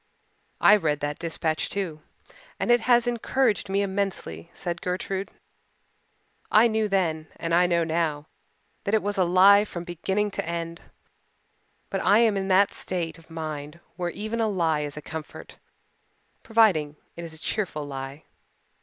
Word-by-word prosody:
"I 210 - +7
read 150 -6 0
that 145 0 -3
dispatch, 160 -1 -2
too, 175 -6 -4 0.6
and - - +1
it 240 - +6
has 240 0 +4
encouraged 240 -2 0
me 200 +1 +1
immensely," 190 - -3
said 175 0 -5
Gertrude. 190 +2 -3 1.2
"I 220 +3 +6
knew 220 -1 0
then 165 -6 0
and 165 0 -3
I 180 +1 +5
know 170 -1 +2
now 160 -2 -1 0.6
that 200 - +1
it 220 - +1
was 205 0 -1
a - - +5
lie 190 +3 +6
from 175 -5 -6
beginning 190 +4 -1
to - - -3
end. 170 0 -4 1.1
But 195 - -1
I 200 +2 +5
am 225 -2 +4
in 190 -1 -1
that 195 +1 +4
state 170 -2 -4
of 165 - -21
mind 155 -1 -6 0.2
where 175 0 -2
even 215 +5 -4
a 225 - +2
lie 165 -7 +1
is 145 0 -4
a 150 - -7
comfort, 155 0 -8 0.8
providing 205 - +3 0.2
it 170 - -7
is 165 -1 -8
a - - -9
cheerful 160 -4 -3
lie." 135 +1 -7
180 Hz, 160 wpm, -26 LUFS, 160-200 Hz, 1.2 s, I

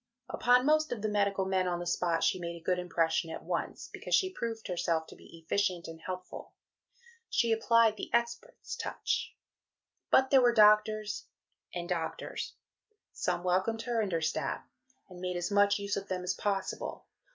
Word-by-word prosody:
Upon 250 +1 +3
most 310 +1 +3
of 225 -4 -4
the - - +2
medical 200 -2 +1
men 190 -1 +1
on 175 -1 0
the 175 - -5
spot 170 -1 0
she 185 - +2
made 170 -1 -5
a 165 - -25
good 180 -1 +1
impression 165 -2 0
at 160 - -6
once, - - -3
because - - 0
she 375 -2 +1
proved 225 -7 -4
herself 170 -3 0
to - - -13
be 165 -1 -15
efficient 185 -2 0
and 165 0 -9
helpful. 185 0 -7 0.8
She 235 -3 +2
applied 225 -1 +4
the - - -6
expert's 235 - -2
touch. - - -2 0.7
But 265 0 +4
there 270 -2 +7
were 240 -1 +4
doctors 210 0 +4 0.4
and 175 -1 -4
doctors. 170 -3 -3 0.6
Some 175 - -2
welcomed 190 +5 +1
her 240 -2 0
and 205 -3 -2
her 165 -1 0
staff, 160 - -2 0.4
and 180 -2 -12
made 180 -1 -2
as 175 +3 -2
much 205 0 +4
use 200 0 -2
of 200 0 -4
them 185 -1 -3
as 180 +1 0
possible. 195 -1 -3
195 Hz, 175 wpm, -31 LUFS, 175-225 Hz, 0.8 s, there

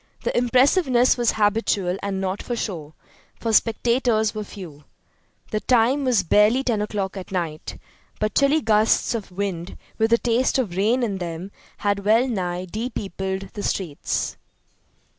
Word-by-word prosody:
The - - -1
impressiveness 255 +1 +4
was 240 -2 +1
habitual 205 -3 +1
and 200 -1 -2
not 190 +1 -2
for 240 - -3
show, 160 -9 -5 0.4
for 225 -1 -1
spectators 230 -1 +2
were 215 - -4
few. 165 -8 -11 0.7
The 215 - 0
time 255 +4 +2
was 240 -7 +3
barely 210 +8 +4
10 230 -5 0
o'clock 205 -2 -3
at 190 -1 -8
night, 165 -5 -4 0.4
but 215 0 -1
chilly 280 +3 +3
gusts 215 0 +2
of 220 -5 -5
wind 180 -2 -4 0.2
with 220 +1 +2
a 235 - +6
taste 240 +3 +1
of 215 -10 -1
rain 225 +6 +2
in 200 -5 -2
them 175 +2 -5 0.3
had 200 -1 -1
well 225 +5 +4
nigh 180 -6 -2
depeopled 195 -2 -4
the 205 - -5
streets. 175 -7 -2
210 Hz, 150 wpm, -23 LUFS, 190-235 Hz, 0.7 s, a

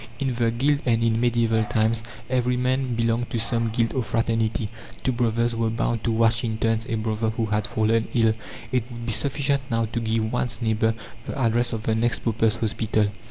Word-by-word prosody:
In 135 -1 -1
the 115 -1 +1
guild 140 +5 +1
and 115 -1 +3
in 115 0 +2
medieval 115 -2 +2
times 110 +1 +1 0.3
every 125 -1 +1
man 130 0 0
belonged 115 +1 0
to - - -2
some 115 0 0
guild 115 0 0
or 130 - +1
fraternity 115 -1 0 0.4
two 130 - +2
"brothers" 115 -1 +1
were 115 -1 +1
bound 115 0 -1
to 115 - +2
watch 115 +1 +2
in 110 -2 -1
turns 115 0 0
a 115 - 0
brother 110 0 -1
who 115 +1 -1
had 105 -1 -1
fallen 110 +1 +1
ill; 115 -2 +4 0.4
it 125 -2 +2
would 120 -1 -7
be 115 - -1
sufficient 140 +2 0
now 115 -1 +1
to 120 +2 -3
give 110 0 -1
one's 125 0 -1
neighbour 110 -1 +1 0.3
the - - -4
address 120 -1 +2
of 110 -1 -3
the 110 - +1
next 115 +2 0
paupers' 115 -1 +2
hospital. 110 -1 0
115 Hz, 205 wpm, -24 LUFS, 110-120 Hz, 0.4 s, ill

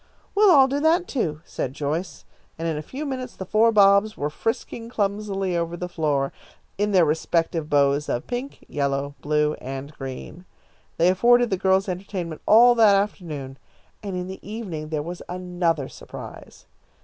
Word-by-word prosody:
"We'll 415 0 +5
all 275 -6 +7
do 275 +2 -1
that, 330 +4 +3
too," 155 - -2
said 130 - -4
Joyce, 155 +5 -3 0.3
and 165 0 -3
in 160 - -1
a 150 - -3
few 275 - -6
minutes 255 -3 -5
the 190 - -6
four 220 +4 +4
Bobs 200 0 +5
were 145 +1 -2
frisking 230 +5 -3
clumsily 200 -4 -1
over 170 0 -2
the 180 - -4
floor, 150 -5 -1 0.4
in 205 +1 0
their 185 -4 +5
respective 160 +1 0
bows 140 0 +2
of 120 - -2
pink, 250 +3 -6
yellow, 140 0 -1
blue, 150 0 +1
and 135 +3 -6
green. 135 +6 -8 0.5
They 170 +2 +4
afforded 240 +5 +4
the - - +3
girls 190 +1 +2
entertainment 180 -3 -5
all 240 +3 +7
that 220 -4 +6
afternoon, 155 -9 -3 0.4
and 200 -3 -5
in 180 0 -3
the 190 +1 -8
evening 185 -8 -6
there 155 -2 -2
was 175 +2 -7
another 175 -5 -1
surprise. - - -11
180 Hz, 165 wpm, -24 LUFS, 150-215 Hz, 0.5 s, all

